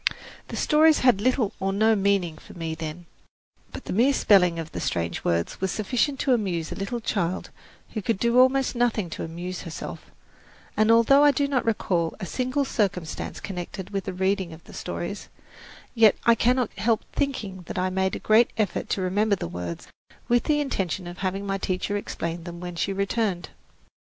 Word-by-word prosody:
The - - -6
stories 310 +1 +4
had 245 -6 +4
little 250 -3 +1
or 195 0 0
no 220 +3 +3
meaning 195 -5 +1
for - - -14
me 165 -2 -3
then; 160 +2 -6 0.7
but - - -9
the - - -3
mere 245 +8 +4
spelling 180 -8 +4
of 165 0 -5
the - - -5
strange 85 -11 -2
words 85 - -1
was 190 - +1
sufficient 250 +6 0
to 265 - +3
amuse 180 -8 -1
a - - -4
little 200 +5 -3
child 185 -5 -2 0.4
who 215 - -2
could 215 +1 0
do 235 +4 +3
almost 260 +1 +4
nothing 230 -7 0
to - - -5
amuse 175 +3 -5
herself; 165 - -7 0.7
and 215 +1 +3
although 230 +5 +6
I 295 - +7
do 285 0 +1
not 270 -3 0
recall 175 -7 0
a 190 - -4
single 255 +7 -1
circumstance 185 -9 -2
connected 190 0 -6
with 195 -1 -3
the - - -4
reading 190 -1 0
of 160 - -13
the - - -14
stories, - - -5 0.6
yet 225 -3 +6
I 235 - +7
cannot 245 +1 +1
help 225 -1 +1
thinking 220 -10 -2
that - - -5
I 185 0 0
made 190 0 0
a - - -9
great 220 +2 +6
effort 210 -5 -1
to 195 - 0
remember 200 +3 +2
the 180 - -5
words, 85 0 -6 0.4
with 240 0 +2
the 295 -1 +2
intention 190 - -2
of 175 +1 -8
having 195 +1 -2
my 195 0 -2
teacher 185 +2 -2
explain 170 -4 -4
them 175 -1 -7
when 175 0 -6
she 180 +4 -1
returned. 200 -1 -1
195 Hz, 190 wpm, -25 LUFS, 175-235 Hz, 0.7 s, I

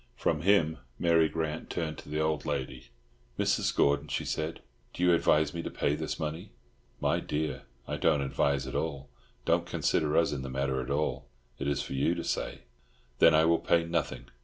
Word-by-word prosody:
From 75 +4 0
him 85 -5 +3 0.2
Mary 85 -2 +4
Grant 80 0 -3
turned 80 -2 -3
to - - -12
the 75 +1 -2
old 80 -1 0
lady. 70 -5 -4 0.5
"Mrs. - - +1
Gordon," 70 +1 +3
she - - -2
said, 80 +1 -3 0.3
"do 90 - -2
you 90 -1 +5
advise 80 -2 +3
me 85 - -3
to - - -4
pay 70 - 0
this 80 0 -3
money?" 80 +6 -4 0.5
"My - - +1
dear, 75 +1 -3 0.2
I - - -2
don't 70 - +3
advise 70 0 0
at 65 - -6
all. 70 -4 -3 0.4
Don't - - +2
consider 75 0 +1
us 85 - +3
in 70 -2 -3
the 65 - -5
matter 65 0 -1
at 65 - -6
all. 75 +2 -1 0.3
It 70 - -2
is 70 -1 0
for - - -6
you 65 - +1
to - - -4
say." - - -3 0.6
"Then 80 -1 +7
I 80 +1 +5
will 85 0 +4
pay 85 -1 +2
nothing. 85 0 -2
75 Hz, 195 wpm, -30 LUFS, 70-80 Hz, 0.6 s, Then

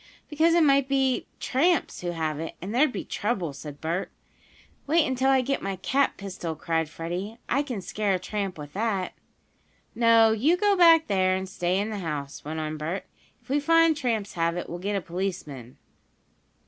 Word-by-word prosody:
"Because 325 +3 +3
it 340 - +5
might 275 -2 +4
be 270 -2 +1
tramps 335 +7 +1
who 175 - -3
have 160 -3 -2
it, 165 - -5
and 195 +5 -6
there'd 275 +4 +3
be - - -5
trouble," 200 -9 -2
said 145 0 -9
Bert. 170 +4 -2 0.8
"Wait 315 +1 +4
until 260 -1 +1
I 265 -1 +4
get 275 +2 -1
my 195 0 -3
cap 265 +9 0
pistol!" 185 -5 -5
cried 160 0 -1
Freddie. 175 +7 -5
"I 275 - +2
can 250 -8 -4
scare 195 +2 -1
a - - +1
tramp 195 0 -4
with 145 -1 -9
that." 200 -3 -1 0.8
"No, 230 -1 +5
you 275 +11 +2
go 410 +1 +3
back 330 -3 +7
there, 185 -2 +2
and 190 0 -3
stay 180 -1 -1
in 205 +3 -1
the 210 - -4
house," 150 -5 -5
went 155 +2 -4
on 155 0 -3
Bert. 165 +6 -4 0.4
"If - - -28
we 285 +2 +2
find 330 +2 +4
tramps 230 -7 -2
have 170 0 0
it, 175 - -4
we'll 175 - -6
get 200 +3 -2
a 195 - 0
policeman." 170 -9 -5
200 Hz, 190 wpm, -26 LUFS, 170-265 Hz, 0.8 s, back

